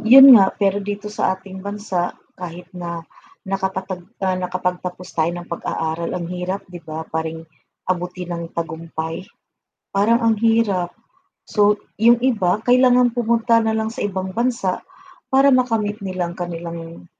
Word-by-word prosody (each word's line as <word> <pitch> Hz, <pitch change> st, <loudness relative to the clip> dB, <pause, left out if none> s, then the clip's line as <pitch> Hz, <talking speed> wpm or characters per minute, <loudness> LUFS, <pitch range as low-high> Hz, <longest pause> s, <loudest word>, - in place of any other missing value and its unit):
yun 265 Hz, +4 st, +10 dB
nga, 195 Hz, -2 st, +6 dB
pero 200 Hz, 0 st, +1 dB
dito 205 Hz, +1 st, -5 dB
sa 190 Hz, -3 st, +1 dB
ating 190 Hz, 0 st, -10 dB
bansa, 200 Hz, -3 st, -3 dB, 0.2 s
kahit 180 Hz, -1 st, -7 dB
na 170 Hz, -2 st, -6 dB, 0.4 s
nakapatag 190 Hz, -1 st, -3 dB, 0.2 s
nakapagtapos 180 Hz, -1 st, -2 dB
tayo 160 Hz, 0 st, +2 dB
ng 175 Hz, 0 st, -9 dB
pag-aaral 165 Hz, 0 st, -2 dB
ang 175 Hz, -2 st, -4 dB
hirap, 180 Hz, +2 st, -3 dB
'di 180 Hz, -1 st, -10 dB
ba 160 Hz, 0 st, -6 dB
paring 160 Hz, 0 st, -4 dB, 0.4 s
abutin 180 Hz, 0 st, -3 dB
ng 170 Hz, 0 st, -4 dB
tagumpay, 165 Hz, 0 st, -4 dB, 0.7 s
parang 220 Hz, +4 st, +3 dB
ang 225 Hz, -1 st, +4 dB
hirap. 225 Hz, -6 st, +2 dB, 0.6 s
So, 210 Hz, -1 st, +3 dB, 0.2 s
yung 235 Hz, +2 st, +7 dB
iba 205 Hz, -8 st, +2 dB
kailangan 250 Hz, -1 st, +5 dB
pumunta 230 Hz, -1 st, +2 dB
na 220 Hz, 0 st, 0 dB
lang 220 Hz, 0 st, -1 dB
sa -, -, -7 dB
ibang 190 Hz, -2 st, -2 dB
bansa 235 Hz, -4 st, 0 dB, 0.5 s
para 270 Hz, +1 st, +5 dB
makamit 225 Hz, -5 st, +1 dB
nilang 185 Hz, -3 st, -3 dB
kanilang 170 Hz, -1 st, -6 dB
190 Hz, 135 wpm, -21 LUFS, 175-220 Hz, 0.7 s, yun